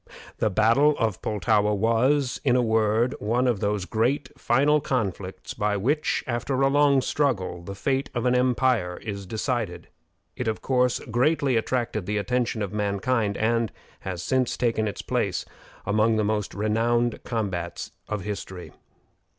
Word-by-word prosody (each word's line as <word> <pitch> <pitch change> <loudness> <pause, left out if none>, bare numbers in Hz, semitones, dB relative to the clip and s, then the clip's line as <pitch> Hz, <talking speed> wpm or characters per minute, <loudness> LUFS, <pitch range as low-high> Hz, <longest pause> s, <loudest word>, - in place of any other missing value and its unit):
The 110 - +2
battle 115 +9 +4
of 110 -5 -1
Pultowa 105 0 +1
was, 125 +6 +1
in 130 -4 +3
a 125 - +4
word, 110 +2 +2
one 120 +5 +1
of 120 -5 +1
those 100 -2 -1
great 125 +7 0
final 145 +5 +2
conflicts 100 -9 -3
by 105 0 0
which, 145 +10 0
after 130 +2 -2
a 135 0 +4
long 140 -1 +4
struggle, 115 - -1
the 100 +3 -7
fate 135 +6 -1
of 120 - -1
an 125 - +3
empire 125 -7 +1
is 100 -3 -5
decided. 110 -3 -3 0.5
It, 125 - -4
of 110 - -1
course, 125 -2 +1
greatly 135 +2 +2
attracted 115 -4 -1
the 105 0 -1
attention 120 0 -1
of 100 - -5
mankind, 105 +1 0
and 115 0 +1 0.3
has 90 -2 -5
since 130 -2 0
taken 115 -3 +1
its 105 - -5
place - - -1 0.4
among 110 +2 +2
the 110 - +1
most 105 -1 -1
renowned 115 +3 0
combats 95 -7 -3 0.2
of 105 -2 -2
history. 95 -3 -6
115 Hz, 150 wpm, -25 LUFS, 105-125 Hz, 0.5 s, battle